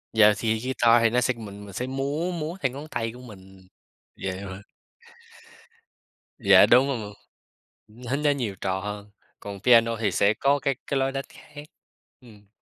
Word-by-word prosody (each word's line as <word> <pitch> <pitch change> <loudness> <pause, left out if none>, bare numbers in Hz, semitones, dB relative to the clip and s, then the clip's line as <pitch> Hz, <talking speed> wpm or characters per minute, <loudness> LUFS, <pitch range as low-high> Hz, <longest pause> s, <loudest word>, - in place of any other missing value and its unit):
Yeah, 105 -1 +6
thì 110 -1 -1
guitar 120 -2 +3
thì 115 - +5
nó 125 +2 +1
sẽ 125 +1 +1
mình 105 -3 -10
mình 100 - -12
sẽ 125 +6 -4
múa 140 +6 -2
múa 170 +1 -5
theo 135 -3 0
ngón 145 +4 -9
tay 115 -6 -3
của 125 +1 -13
mình 95 -5 -15 0.5
vậy 95 0 -4
thôi. 95 0 -8 1.8
Yeah, - - +6
đúng 130 +3 +6
m 110 -6 -4 1.0
nó 140 - 0
nó 150 0 +1
nhiều 120 -8 -3
trò 95 0 -1
hơn, 105 +1 -7 0.3
còn 100 -1 -8
piano 115 0 +4
thì 105 -4 0
sẽ 100 +4 +2
có 140 +5 +1
cái 135 0 -1
cái 140 - -1
lối 135 0 0
đánh 135 0 -4
khác. 145 0 -13 0.6
Ừm, 105 -4 -18
115 Hz, 175 wpm, -25 LUFS, 105-135 Hz, 1.8 s, Yeah